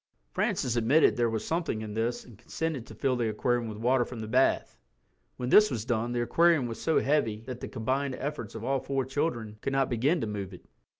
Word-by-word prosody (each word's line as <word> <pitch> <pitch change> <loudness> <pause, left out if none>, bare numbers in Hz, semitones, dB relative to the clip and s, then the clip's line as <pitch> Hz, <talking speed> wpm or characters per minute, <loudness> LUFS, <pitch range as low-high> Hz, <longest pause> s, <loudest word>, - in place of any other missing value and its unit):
Francis 120 - 0
admitted 120 +7 +4
that - - -9
there 120 -1 +2
was 110 -1 -3
something 165 -9 -1
in 105 -1 -6
this 115 +2 -2
and 120 - -14
consented 140 0 -4
to - - -11
fill 135 -2 0
the 120 -2 0
aquarium 120 +2 0
with 105 -1 -6
water 125 +3 +2
from 120 -1 -8
the 110 - -5
bath. 130 +4 +2 0.6
When 125 0 -3
this 210 +9 +7
was 115 -3 -3
done 120 -1 -1
the 120 0 0
aquarium 165 +1 +3
was 115 -1 -6
so 160 - +2
heavy 120 -7 +1
that 125 +1 -7
the - - -6
combined 130 +4 -2
efforts 140 -7 -5
of 115 - -6
all 135 +2 +1
four 135 -1 -2
children 120 -6 -2
could 135 - -2
not 135 -1 +1
begin 135 +9 +2
to - - 0
move 100 -3 -5
it. - - -17
120 Hz, 230 wpm, -29 LUFS, 110-135 Hz, 0.6 s, this